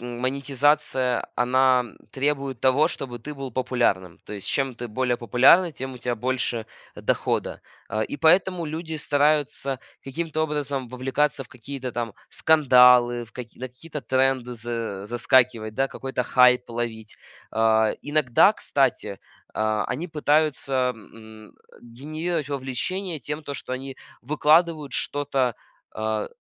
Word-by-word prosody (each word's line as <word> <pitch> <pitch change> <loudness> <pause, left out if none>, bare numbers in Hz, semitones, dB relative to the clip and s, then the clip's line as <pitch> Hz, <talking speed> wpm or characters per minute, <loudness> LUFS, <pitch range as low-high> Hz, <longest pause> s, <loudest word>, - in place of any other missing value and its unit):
монетизация, 130 +2 0
она 125 +1 +3 0.3
требует 135 -2 -1
того, 130 +5 +4
чтобы 130 -7 -5
ты 150 +6 -8
был 135 -2 -6
популярным. 115 -8 -1
То - - -9
есть 100 -2 -6
чем 135 -3 -1
ты 120 - -5
более 125 +2 -1
популярный, 130 - +5
тем 130 -1 -6
у - - -10
тя 120 0 -2
больше 120 -1 -2 0.3
дохода. - - -1 0.3
Э, 110 +1 0
и - - -6
поэтому 175 +3 +3
люди 160 +1 -5
стараются 145 -2 +1 0.2
каким-то 155 +3 -3
образом 145 -4 -2
вовлекаться 135 +3 -1
в - - -17
какие-то 130 +1 -7
там 115 -1 -4 0.2
скандалы, 125 -5 +5
в 115 - -21
каки 120 -3 -9
на 130 - -4
какие-то 150 +5 -9
тренды 130 0 0
за 115 -4 -5
заскакивать, 120 -1 +2
да, 135 +3 +1
какой-то 130 -1 -4
хайп 125 -1 +4
ловить. 115 -2 -5 0.3
А, 110 -1 +3
иногда, 145 -5 +4
кстати, - - 0 0.3
а, 110 -1 0
они 165 +7 -3
пытаются, 145 -4 +1
эм, 110 0 -15 0.3
генерировать 155 +6 -4
вовлечение 145 +7 -3
тем, 150 +4 -5
то 145 - -6
что 130 - -5
они 135 +1 -6 0.3
выкладывают 155 +2 +2
что-то, 135 -4 -1 0.4
а, 110 0 -2
130 Hz, 130 wpm, -24 LUFS, 120-145 Hz, 0.4 s, популярный